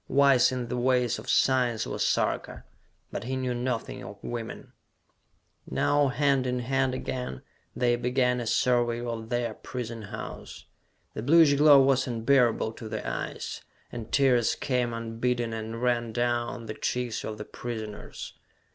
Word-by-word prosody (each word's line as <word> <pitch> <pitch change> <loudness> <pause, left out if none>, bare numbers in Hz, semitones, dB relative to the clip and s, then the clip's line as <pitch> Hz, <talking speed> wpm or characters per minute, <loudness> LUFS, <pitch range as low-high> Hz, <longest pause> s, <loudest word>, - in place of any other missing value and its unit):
Wise 135 -3 +5
in 125 -2 -3
the 125 - -3
ways 125 -2 +2
of 115 - -9
science 125 -4 +2
was - - -2
Sarka, - - 0 0.5
but - - -5
he 130 +2 -2
knew 130 -1 -1
nothing 120 -1 -3
of 105 - -9
women! 120 -2 -6 1.0
Now 145 -1 +2
hand 135 -1 +2
in 125 0 0
hand 130 +1 0
again, 130 +1 -4 0.3
they 120 -1 +2
began 125 0 +1
a 120 - -4
survey 120 0 +2
of 115 -1 -5
their 120 -1 -1
prison 115 -2 -6
house. 100 - -8 0.5
The - - -4
bluish 155 +3 +6
glow 145 0 +7
was 130 -1 +2
unbearable 120 -1 +2
to 110 0 -9
the - - -4
eyes, - - -4 0.3
and 115 -2 -7
tears 125 -4 +3
came 125 -3 0
unbidden 115 +1 -2
and 110 +2 -5
ran 120 -2 +1
down 120 0 -1
the 110 - -5
cheeks 125 0 -2
of 110 - -5
the 105 - -7
prisoners. 110 -3 -7
120 Hz, 150 wpm, -27 LUFS, 115-130 Hz, 1.0 s, glow